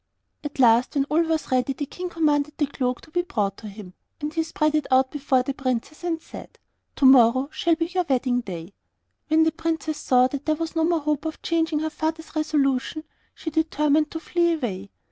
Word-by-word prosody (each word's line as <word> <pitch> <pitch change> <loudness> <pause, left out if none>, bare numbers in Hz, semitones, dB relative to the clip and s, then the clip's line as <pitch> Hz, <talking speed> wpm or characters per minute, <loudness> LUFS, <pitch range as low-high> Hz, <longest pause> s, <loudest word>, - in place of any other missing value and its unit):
At 295 -1 -6
last, 240 0 +4
when 275 -1 +2
all 320 +2 +4
was 320 -3 -1
ready, 255 +1 +1
the 290 +2 -4
King 360 +5 -6
commanded 300 -3 +1
the 295 - +2
cloak 255 -3 -2
to 320 - -18
be 350 - +1
brought 205 - -2
to 220 - -9
him, 200 -3 -10 0.3
and 300 +1 -4
he 325 - +1
spread 310 -1 0
it 305 -2 0
out 260 0 +3
before 270 -3 +1
the 275 - -3
Princess, 265 +3 -3
and 335 -2 -1
said, - - -12 0.4
'Tomorrow 260 -1 +5
shall 335 -1 +1
be 330 +1 -1
your 360 +1 -1
wedding 250 -2 +1
day.' 180 -3 -8 0.5
When 315 +1 +4
the 320 - +2
Princess 320 -1 -3
saw 250 -1 +4
that 280 +2 -6
there 310 - +3
was 330 +1 -5
no 325 0 +2
more 335 -1 +1
hope 300 0 -1
of 315 - -5
changing 325 -2 0
her 315 0 -2
father's 320 +1 -4
resolution, 300 -1 0 0.3
she 320 - -6
determined 305 -1 +1
to 320 - -5
flee 340 0 +1
away. 200 - -4
300 Hz, 205 wpm, -24 LUFS, 260-320 Hz, 0.5 s, Tomorrow